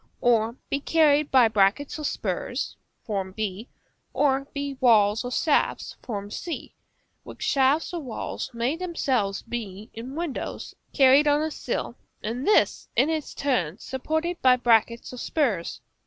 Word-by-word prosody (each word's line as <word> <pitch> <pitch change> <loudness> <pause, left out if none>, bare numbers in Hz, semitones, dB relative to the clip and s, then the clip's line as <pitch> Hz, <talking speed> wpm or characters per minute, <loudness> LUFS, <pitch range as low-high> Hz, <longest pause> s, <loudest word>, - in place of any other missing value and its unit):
or 230 -2 +3
be 280 - -1
carried 300 -1 +3
by 255 -3 +6
brackets 215 +8 +1
or - - -5
spurs, - - -3 0.6
b, 215 +1 -4 0.4
or 275 -1 +1
by 280 -1 -3
walls 215 -3 +4
or 245 - -4
shafts, 295 +4 0 0.4
c, 335 +8 -6 0.5
which - - -9
shafts 275 +5 +2
or 345 - -2
walls 260 -2 -5
may 240 +5 -1
themselves 265 - -1
be, 215 -3 -6
in 245 +5 -7
windows, 330 -4 -4 0.2
carried 275 +1 +5
on 295 +1 +3
a 315 - -2
sill; - - -4 0.3
and 235 +5 -3
this, 425 - +3
in 275 +6 +3
its 315 -2 -3
turn, 200 - 0
supported 315 +8 -3
by 255 -1 +6
brackets 235 -1 +2
or - - -7
spurs. 235 - -1
260 Hz, 140 wpm, -25 LUFS, 225-295 Hz, 0.6 s, by